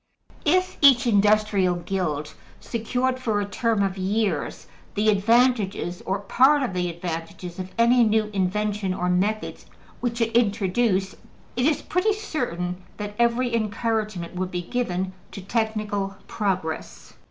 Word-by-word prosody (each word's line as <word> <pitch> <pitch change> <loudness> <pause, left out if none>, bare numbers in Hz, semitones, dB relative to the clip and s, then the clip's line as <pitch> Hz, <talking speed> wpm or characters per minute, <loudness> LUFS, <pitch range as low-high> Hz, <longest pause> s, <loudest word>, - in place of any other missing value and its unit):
If 365 +4 +2
each 270 -4 +7
industrial 205 -4 +3
guild 170 -4 -3 0.3
secured 250 +3 -1
for 220 -5 0
a 205 - -1
term 210 +1 0
of 195 -1 -2
years 195 -3 -1 0.3
the 215 +1 +2
advantages, 210 -4 +2
or 190 - +1
part 270 +7 +4
of 240 - -2
the 180 -1 -1
advantages, 170 +1 -6
of 185 0 -6
any 235 +1 +5
new 215 -1 +2
invention 200 0 0
or 180 0 -1
methods 205 +4 -1 0.3
which 235 -1 -2
it 230 -1 0
introduced, 200 -2 +2 0.4
it 250 +3 +2
is 310 - +1
pretty 385 +5 +1
certain 185 - -3 0.2
that 205 -1 -5
every 235 +1 +2
encouragement 215 -4 -2
would 185 0 -2
be 180 -1 -3
given 185 -3 -2 0.2
to 195 - -7
technical 210 -1 -2
progress. 185 -6 -3
210 Hz, 135 wpm, -24 LUFS, 185-235 Hz, 0.4 s, each